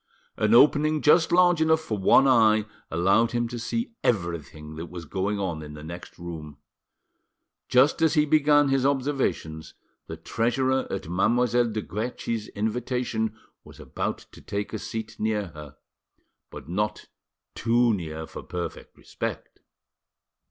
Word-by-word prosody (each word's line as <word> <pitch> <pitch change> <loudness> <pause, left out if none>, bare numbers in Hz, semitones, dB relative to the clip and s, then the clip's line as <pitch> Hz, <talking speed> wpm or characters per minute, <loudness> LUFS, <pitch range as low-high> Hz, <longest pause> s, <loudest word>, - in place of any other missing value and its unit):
An 110 +1 +2
opening 150 +3 +4
just 160 +2 +5
large 175 -2 +4
enough 160 0 +4
for 115 -9 -3
one 105 +7 +5
eye 110 -4 +4 0.2
allowed 100 +8 +2
him 120 0 0
to 120 0 -5
see 230 - -3
everything 85 - -2
that 85 +2 -6
was 85 0 -8
going 95 +6 -2
on 85 -5 -3
in 75 -1 -9
the 75 - -10
next 85 +3 -9
room. 80 -4 -8 1.1
Just 130 +5 +4
as 160 0 +3
he 150 -1 +4
began 145 -1 +4
his 135 -1 +2
observations, 130 - -1 0.3
the - - -7
treasurer 130 +3 0
at 95 - -4
Mademoiselle 120 +7 +2
de 110 -1 -3
Guerchi's 110 +4 -4
invitation 110 0 -2 0.3
was - - -15
about - - -3
to - - -14
take 100 +2 -4
a 110 - -3
seat 110 0 -6
near 105 -3 -1
her, 75 -3 -11 0.7
but - - -10
not 105 +5 -2 0.5
too 120 +1 +2
near 80 -4 -5
for - - -9
perfect 90 -1 -7
respect. - - -6
110 Hz, 145 wpm, -26 LUFS, 90-130 Hz, 1.1 s, just